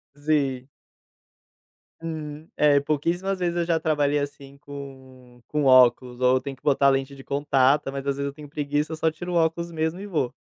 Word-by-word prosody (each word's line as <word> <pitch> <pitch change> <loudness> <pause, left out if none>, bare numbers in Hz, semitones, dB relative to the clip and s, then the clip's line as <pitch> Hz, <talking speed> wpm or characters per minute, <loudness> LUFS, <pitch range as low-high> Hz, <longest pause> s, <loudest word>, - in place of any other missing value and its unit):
Sim. 145 -4 -1 1.3
Hum, 155 -1 -6
é. 145 -1 +4
Pouquíssimas 170 +7 -1
vezes 175 -1 -1
eu 175 - +1
já 165 -1 +1
trabalhei, 145 -2 +1
assim, 140 -1 -6
com 130 -3 -12
com 150 -1 -1
óculos, 125 -1 +4
ou 130 0 +4
eu - - 0
tenho 135 0 -7
que - - -32
botar 140 -1 +3
lente 135 0 0
de 135 - -12
contato. 140 0 +2
Mas, 140 0 -5
às 140 -1 0
vezes, 140 0 -2
eu - - -6
tenho 145 0 -12
preguiça. 150 +2 -2
Só 160 0 +1
tiro 175 +3 -7
o 175 - -1
óculos 170 +1 +1
mesmo 160 +2 -2
e 200 - -6
vou. 155 -10 -1
145 Hz, 190 wpm, -24 LUFS, 135-160 Hz, 1.3 s, é